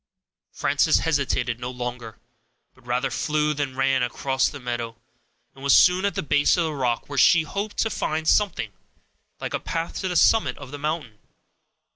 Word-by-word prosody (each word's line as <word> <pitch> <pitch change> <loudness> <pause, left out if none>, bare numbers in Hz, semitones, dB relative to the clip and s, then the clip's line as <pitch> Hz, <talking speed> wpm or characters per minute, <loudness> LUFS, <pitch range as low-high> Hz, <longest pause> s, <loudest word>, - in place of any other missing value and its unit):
Frances - - +2
hesitated 140 -6 0
no 125 0 -4
longer, 125 -3 -6 0.6
but 130 -1 -23
rather 125 +2 0
flew 150 0 0
than 140 -3 -3
ran 135 0 +2
across 130 +2 0
the 145 - -9
meadow, 120 -2 -4 0.6
and 135 - -14
was 140 - +5
soon 180 +2 +5
at 200 - -1
the - - -2
base 145 +3 +3
of 175 - +2
the 160 -1 -2
rock, 125 -4 -1
where 140 -1 -2
she 170 -1 +6
hoped 200 +7 -5
to 225 - +1
find 155 -3 -2
something 175 - +1 0.7
like - - -5
a - - 0
path 165 0 -4
to 190 - -2
the 180 - -3
summit 175 - +3
of 140 -2 -10
the 145 - -7
mountain. 150 -8 -4
140 Hz, 180 wpm, -24 LUFS, 125-160 Hz, 0.7 s, she